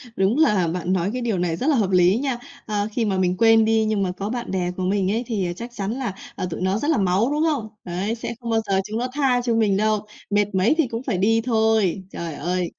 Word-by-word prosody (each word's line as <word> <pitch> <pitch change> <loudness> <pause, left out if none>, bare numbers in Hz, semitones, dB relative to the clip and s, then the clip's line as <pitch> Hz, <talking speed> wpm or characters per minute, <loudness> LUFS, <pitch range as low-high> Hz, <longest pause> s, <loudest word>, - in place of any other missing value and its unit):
Đúng 195 +7 +2
là 210 - +3
bạn 180 +2 -1
nói 185 +1 0
cái 250 - -3
điều 225 -6 0
này 175 -2 0
rất 260 - -3
là 305 - +4
hợp 210 -6 +1
lý 180 +3 +4
nha. 265 -2 -1 0.3
À, 210 -1 -1
khi 230 +1 0
mà 195 -3 0
mình 180 -1 +1
quên 225 -1 +5
đi, 220 0 +2
nhưng 215 -2 0
mà 185 - -1
có 195 +3 -5
bạn 240 -3 -4
bè 180 -2 -1
của 185 +1 -5
mình 190 0 +1
ấy 230 +3 0
thì 205 -6 -1
chắc 235 +6 -7
chắn 200 -1 -3
là, 245 -4 -3 0.2
à, - - -3
tụi 165 - -5
nó 190 +3 +1
rất 295 - 0
là 315 - +2
máu, 195 +7 +2
đúng 300 +2 +1
không? 285 -9 0 0.2
Đấy, 190 +6 -2
sẽ 230 - -5
không 235 -2 -6
bao 225 -1 +2
giờ 195 -1 +2
chúng 215 +3 -4
nó 250 - -1
tha 265 -4 +2
cho 240 -2 0
mình 210 -4 +2
đâu, 215 0 +1 0.2
mệt 205 -1 +1
mấy 190 +10 +3
thì 320 -6 +2
cũng 230 +2 -5
phải 220 -9 -1
đi 225 +4 +3
thôi. 220 -5 +1
Trời 170 -2 -5
ơi, 175 +4 -2
210 Hz, 270 wpm, -22 LUFS, 185-235 Hz, 0.3 s, quên